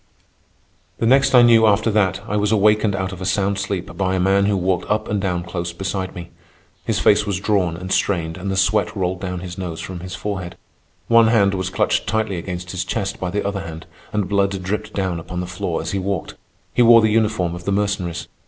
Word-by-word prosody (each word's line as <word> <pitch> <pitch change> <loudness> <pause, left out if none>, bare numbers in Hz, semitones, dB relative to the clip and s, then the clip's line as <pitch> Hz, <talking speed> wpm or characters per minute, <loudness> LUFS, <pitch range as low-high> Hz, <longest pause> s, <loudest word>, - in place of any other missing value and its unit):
The - - -1
next 135 +2 +4
I 125 - +8
knew 115 -2 +6
after 110 +2 +2
that 95 -3 +1
I 105 - -2
was 105 0 +1
awakened 105 -1 +3
out 95 0 -2
of 95 -1 -9
a - - -3
sound 100 +1 0
sleep 95 -4 -4
by 95 0 0
a - - 0
man 100 +2 +3
who 100 -1 +1
walked 90 0 -1
up 105 +1 0
and 105 -1 -1
down 90 -3 -1
close 85 0 -4
beside 95 +1 -4
me. 85 -1 -8 0.5
His - - -1
face 105 +1 +3
was 100 -3 -1
drawn 95 -5 0
and 90 +1 -7
strained, 85 -6 0
and 90 +3 -5
the 95 - -1
sweat 95 0 +1
rolled 90 -2 -2
down 90 -2 -4
his 90 0 -7
nose 85 -3 -5
from 95 -2 -6
his 90 +2 -7
forehead. 95 -4 -5 0.5
One 115 -1 +6
hand 100 -4 +3
was 95 -1 -2
clutched - - 0
tightly 110 -3 -1
against 90 +1 -5
his 90 0 -2
chest 100 0 -3
by 90 - -2
the 105 +3 -2
other 100 0 -2
hand, 80 -1 -8 0.3
and 105 -3 -1
blood 100 -1 0
dripped 105 +3 -3
down 95 -4 -1
upon 90 +2 -6
the 90 - -2
floor 90 -2 -3
as 80 - -4
he 100 - -1
walked. 95 -3 -3 0.4
He - - +2
wore 115 -1 +8
the 110 -1 +2
uniform 105 -6 +1
of 85 0 -8
the 100 - 0
Mercenaries. 95 -4 -1
95 Hz, 225 wpm, -20 LUFS, 90-105 Hz, 0.5 s, I